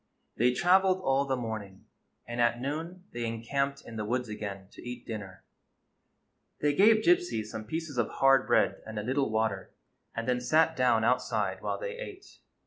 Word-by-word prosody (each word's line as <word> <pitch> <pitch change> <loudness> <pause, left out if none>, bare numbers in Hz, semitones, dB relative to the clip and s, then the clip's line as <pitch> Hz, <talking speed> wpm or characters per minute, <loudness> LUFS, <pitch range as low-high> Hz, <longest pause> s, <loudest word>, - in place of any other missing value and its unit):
They 125 +2 +3
traveled 185 +6 +4
all 135 -3 +2
the 135 -1 0
morning, 110 -5 -6 0.4
and 120 0 -2
at 120 0 +2
noon 160 +7 -4
they 120 - -3
encamped 140 +5 -2
in 115 - -8
the 105 - -2
woods 125 +2 -2
again 100 -3 -6
to - - -13
eat 120 0 -7
dinner. 100 -5 -7 1.2
They 145 0 +2
gave 215 +6 +5
Gypsy 350 - +2
some 110 0 -7
pieces 155 +1 -4
of 120 - +1
hard 135 -1 +4
bread - - +2
and 110 -1 -7
a 105 - -2
little 135 +3 0
water, 110 -3 -1 0.4
and 115 +1 -3
then 125 -1 +1
sat 160 +6 +3
down 125 -3 +3
outside 125 +3 0
while - - -2
they - - -5
ate. 405 -5 -10
125 Hz, 175 wpm, -29 LUFS, 110-155 Hz, 1.2 s, gave